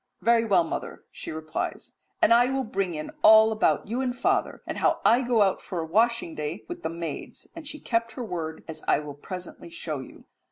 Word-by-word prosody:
"Very 230 0 +4
well, 190 -6 +4
mother," 165 - -5
she - - -7
replies, 155 0 -5 0.2
"and 230 - +7
I 245 +2 +5
will 265 0 0
bring 195 -6 -2
in 155 0 -5
all 220 0 +8
about 215 -1 +1
you 240 +5 -1
and 250 -1 -2
father, 380 +7 0
and - - -4
how - - +2
I 240 +3 +6
go 240 -4 +3
out 190 -2 +1
for 180 - -5
a 160 - -2
washing 225 +1 +1
day 155 +6 -5
with 350 0 -7
the - - -2
maids," 165 -3 -6
and 325 -3 -8
she 300 +1 -5
kept 230 -3 -1
her 245 +1 -5
word, 165 -5 -5
as 160 - -8
I - - +5
will 150 -1 -6
presently 180 +4 -8
show 160 -3 -4
you. 130 - -12
210 Hz, 215 wpm, -26 LUFS, 165-235 Hz, 0.2 s, all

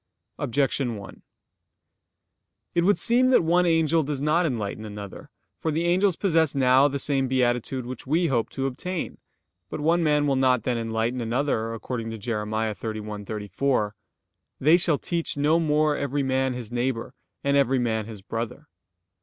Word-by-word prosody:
Objection 135 -3 0
1: 100 -2 -10 1.5
It 170 - +2
would 200 +3 +4
seem 245 +2 +4
that 255 - +5
one 175 +2 +3
angel 165 -1 +3
does 145 -2 -3
not 155 +4 +2
enlighten 110 -5 -3
another. 105 -2 -8 0.3
For 160 - -2
the 160 +2 0
angels 185 +1 +3
possess 165 -7 +1
now 130 +1 +5
the 140 0 -2
same 135 -1 0
beatitude 125 0 0
which 130 +1 -7
we 165 +5 +2
hope 120 -7 0
to 135 - -3
obtain. 165 +7 -4 0.5
But - - -5
one 165 +3 +2
man 150 -2 +2
will 140 -2 +2
not 130 -3 +2
then 120 -1 -1
enlighten 115 +2 -1
another, 115 -1 -1
according 115 0 -5
to 115 - -5
Jer. 110 0 -3
31:34: 110 +2 -2 0.7
"They 155 +5 +5
shall 165 -4 +2
teach 170 -2 -2
no 150 +3 +3
more 150 -1 +2
every 140 0 -1
man 130 0 0
his 120 -2 -7
neighbor, 120 -1 -2 0.3
and 140 0 +2
every 135 -1 +3
man 110 -3 -1
his 105 -4 -10
brother." 115 +2 -5
135 Hz, 160 wpm, -25 LUFS, 115-155 Hz, 1.5 s, that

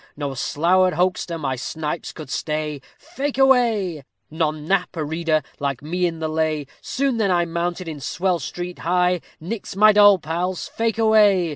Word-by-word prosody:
_ - - -28
No 145 -2 -3
slour'd 180 +7 +2
hoxter 180 -1 0
my 135 -3 -2
snipes 150 +5 -4
could 155 -4 -10
stay, 150 -2 -3 0.2
Fake 275 +1 -4
away. 230 - +3 0.3
None 155 -1 -1
knap 195 0 0
a 155 - -1
reader 160 0 0 0.2
like 140 -2 -2
me 175 +4 0
in 165 -1 -4
the 160 0 -2
lay. 155 -2 -1 0.2
Soon 270 -2 -1
then 215 -3 +1
I 175 -1 +2
mounted 170 +1 -3
in 155 -3 -6
swell 180 +5 -1
street 175 +5 -6
high. 180 0 +1 0.2
_Nix 190 +4 -6
my 215 +2 +7
doll 205 -1 +7
pals, 175 +3 -3
fake 225 -1 -1
away. 210 -5 +4
175 Hz, 170 wpm, -22 LUFS, 155-195 Hz, 0.3 s, my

